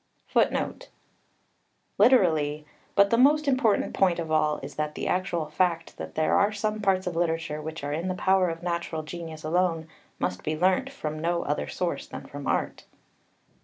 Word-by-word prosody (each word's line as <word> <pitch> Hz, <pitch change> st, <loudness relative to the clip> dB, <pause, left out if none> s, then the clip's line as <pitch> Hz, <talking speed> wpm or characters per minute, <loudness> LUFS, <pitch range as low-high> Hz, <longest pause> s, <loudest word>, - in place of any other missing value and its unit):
[Footnote -, -, 0 dB, 1.1 s
1: 210 Hz, +5 st, +7 dB
Literally, 155 Hz, -, +2 dB, 0.3 s
"But 200 Hz, 0 st, +5 dB
the 230 Hz, -, +4 dB
most 295 Hz, +3 st, +5 dB
important 255 Hz, -6 st, +2 dB
point 185 Hz, -3 st, +2 dB
of 165 Hz, -2 st, -4 dB
all 155 Hz, -1 st, +2 dB
is 140 Hz, -, -7 dB
that 150 Hz, 0 st, -3 dB
the -, -, -3 dB
actual 180 Hz, -3 st, 0 dB
fact 165 Hz, +2 st, -1 dB
that 80 Hz, 0 st, -7 dB
there 155 Hz, -, +3 dB
are 200 Hz, +1 st, +3 dB
some 215 Hz, 0 st, -2 dB
parts 190 Hz, -2 st, +2 dB
of 180 Hz, -2 st, -3 dB
literature 165 Hz, -2 st, -1 dB
which 160 Hz, 0 st, -6 dB
are 145 Hz, 0 st, -2 dB
in 165 Hz, +4 st, -2 dB
the 185 Hz, -, -1 dB
power 190 Hz, 0 st, +3 dB
of 165 Hz, +1 st, -6 dB
natural 170 Hz, -2 st, -2 dB
genius 160 Hz, -1 st, -8 dB
alone, 165 Hz, 0 st, 0 dB, 0.3 s
must 90 Hz, -, -2 dB
be 155 Hz, 0 st, -2 dB
learnt 190 Hz, +10 st, +2 dB
from 155 Hz, -, -5 dB
no 170 Hz, +1 st, 0 dB
other 145 Hz, -, -2 dB
source 180 Hz, -1 st, -3 dB
than -, -, -8 dB
from 145 Hz, -1 st, -8 dB
art." -, -, -1 dB
170 Hz, 180 wpm, -27 LUFS, 155-190 Hz, 1.1 s, 1